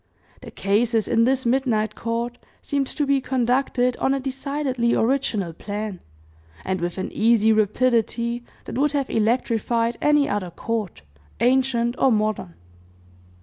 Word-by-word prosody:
The - - -9
cases 220 +2 +1
in 230 -1 +3
this 260 +1 +1
midnight 235 -4 +1
court 235 +1 -3 0.2
seemed 280 -2 -1
to 295 - -2
be 275 -1 +2
conducted 250 0 +1
on 270 +1 +1
a - - -1
decidedly 265 -2 -1
original 225 -8 0
plan, 205 +1 -5 0.7
and 190 -1 -2
with 175 +1 -3
an 190 - -4
easy 220 0 +3
rapidity 235 +2 +1 0.2
that 245 - -4
would 295 +1 +2
have 280 -2 -1
electrified 230 +1 0
any 295 -1 +3
other 200 -3 -2
court, 205 - -4 0.4
ancient 245 -1 +2
or 265 - +4
modern. 215 - -1
235 Hz, 135 wpm, -23 LUFS, 215-265 Hz, 0.7 s, or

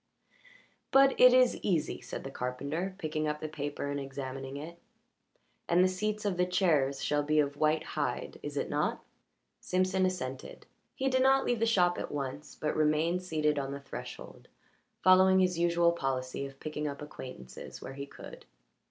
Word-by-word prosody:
"But 270 0 +6
it 250 0 +10
is 255 0 +4
easy," 170 -7 0
said - - -7
the 135 - -6
carpenter, 140 +10 -3
picking 155 -3 -2
up 150 0 -2
the 155 - -4
paper 145 -1 -4
and 145 - -2
examining 135 0 -6
it. 165 +4 -8 0.9
"And 175 +2 +5
the - - +5
seats 210 +3 -2
of 195 -3 0
the 180 - +3
chairs 155 -7 +2
shall 145 0 +1
be 150 +1 0
of 145 -1 +1
white 155 +1 +2
hide, - - -3
is - - -6
it - - 0
not?" - - -1 0.6
Simpson 185 +1 +1
assented. 135 -8 -5 0.3
He 270 - -1
did 260 -1 +2
not 270 +1 +4
leave 240 -2 +1
the 230 - +2
shop 180 -5 +3
at - - -5
once, 140 0 -5
but 150 - -2
remained 155 +3 +2
seated 155 -4 0
on 135 0 -3
the 140 - -5
threshold, 140 - -9 0.6
following 185 +1 +6
his 180 -2 +2
usual 170 0 +3
policy 135 -3 -2
of 135 0 -15
picking 150 -1 -4
up 140 0 -5
acquaintances 130 - -9
where 135 - -8
he 140 +1 -6
could. - - -12
155 Hz, 175 wpm, -31 LUFS, 140-185 Hz, 0.9 s, it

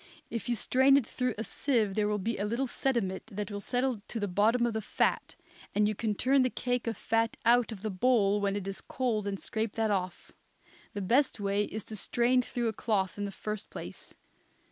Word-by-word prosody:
If 230 -1 -4
you 240 - +2
strain 265 +5 +4
it 275 - +1
through 250 0 -2
a 220 - -2
sieve 230 -6 0
there 210 +1 +1
will 210 0 0
be 220 +3 -2
a - - 0
little 235 +6 0
sediment 235 -7 -1
that 210 +1 -5
will 205 - -4
settle 245 0 -1
to 230 - -4
the 205 - -1
bottom 215 +6 +3
of 235 - 0
the 220 - -1
fat, - - 0 0.4
and 210 0 +4
you 215 - 0
can 215 0 -1
turn 270 +5 +3
the 255 - +3
cake 245 -1 -2
of 225 -3 -2
fat 225 0 0
out 240 0 +4
of 205 -2 -8
the 215 - -1
bowl 205 -1 +3
when 200 0 +1
it 200 -2 -4
is 195 -1 -5
cold 230 -5 -1
and 195 -1 -3
scrape 220 -1 -2
that 220 -1 0
off. 185 -3 -3 0.6
The 205 - -2
best 255 +6 +2
way 200 +1 +1
is 215 0 -5
to 220 - -7
strain 245 +4 +2
through 240 -1 -2
a - - -3
cloth 200 -3 -1
in 205 - -1
the 200 - -4
first 210 +1 -5
place. - - -9
220 Hz, 225 wpm, -30 LUFS, 205-245 Hz, 0.6 s, strain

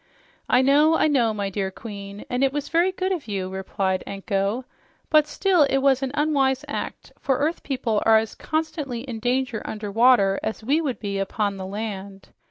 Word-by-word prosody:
"I 250 - +5
know, 295 +4 +5
I - - +3
know, 250 -7 +2
my 200 -2 -3
dear 195 0 -2
Queen, 200 0 -9
and 250 +2 -1
it 270 - +3
was 290 0 -4
very 340 +3 +3
good 375 0 -2
of 345 -9 -3
you," 195 -3 -3
replied 190 0 -2
Anko. 200 +4 -2 0.5
"But 305 -1 +5
still 370 +2 +2
it 270 - +2
was 270 -1 +3
an 270 - -1
unwise 275 -3 +1
act, - - -5
for 265 -2 +1
earth 305 +5 -1
people 240 -6 -1
are 225 0 +6
as 220 0 -1
constantly 310 -6 -3
in 245 -3 -6
danger 250 0 -1
under 210 -1 -5
water 225 -3 +4
as 220 - -4
we 285 +8 +2
would 275 -6 -2
be 200 -2 -3
upon 200 +1 -1
the 190 -1 -6
land. 200 -1 -6
240 Hz, 190 wpm, -24 LUFS, 200-280 Hz, 0.5 s, are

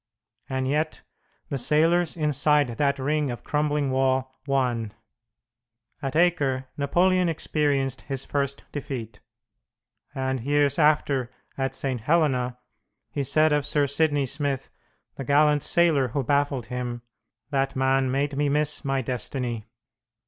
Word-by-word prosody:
And 130 -1 -1
yet 155 +3 -1 0.5
the 140 - -2
sailors 165 +6 +2
inside 150 -2 +2
that 140 +4 0
ring 145 +1 0
of 120 - -6
crumbling 150 -2 0
wall 130 0 +1
won! 120 -6 0 1.1
At 135 -1 -3
Acre 145 -7 +2
Napoleon 180 +5 +2
experienced 145 -4 0
his 135 -2 -3
first 140 -1 -2
defeat; 120 -7 -6 1.0
and, 130 -1 -1
years 145 +3 +1
after, 145 -5 +2 0.3
at 135 -1 -2
St. 130 -4 -2
Helena, 130 -4 +1 0.5
he 140 - -2
said 155 +3 +3
of 150 -1 +2
Sir 145 0 +1
Sidney 145 0 +1
Smith, 140 0 -2 0.5
the - - -4
gallant 145 +2 +4
sailor 160 -6 +3
who 135 +4 -2
baffled 140 -2 +1
him, 120 -1 -4 0.5
"That 135 -1 0
man 130 0 +2
made 140 +2 0
me 145 0 +1
miss 150 +1 +1
my 135 -2 0
destiny." 120 -2 -3
140 Hz, 125 wpm, -25 LUFS, 130-150 Hz, 1.1 s, gallant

